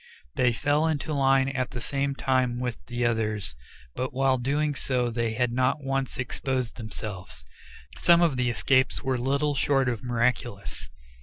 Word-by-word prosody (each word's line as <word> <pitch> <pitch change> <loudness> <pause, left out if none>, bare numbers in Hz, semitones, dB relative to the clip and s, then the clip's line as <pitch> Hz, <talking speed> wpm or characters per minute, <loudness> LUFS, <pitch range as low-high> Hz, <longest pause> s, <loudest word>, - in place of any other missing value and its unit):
They 125 -1 +3
fell 145 +6 +1
into 155 -1 -1
line 135 -1 +3
at 130 -2 -2
the 125 - -6
same 140 +1 -1
time 130 -3 +1
with 125 -2 -4
the 120 0 -1
others, 105 - -1 0.4
but 130 - -3
while 130 0 +2
doing 145 +4 0
so 125 -3 -1
they 115 -1 -1
had 125 +1 0
not 130 +4 +1
once 135 -1 -2
exposed 130 -1 -2
themselves. 105 - -7 0.5
Some 170 0 +5
of 160 -6 +2
the 125 -1 +1
escapes 130 +4 +2
were 130 -2 0
little 140 +4 +1
short 135 -1 +2
of 120 -3 -2
miraculous. 120 -3 -1
130 Hz, 160 wpm, -26 LUFS, 120-135 Hz, 0.5 s, Some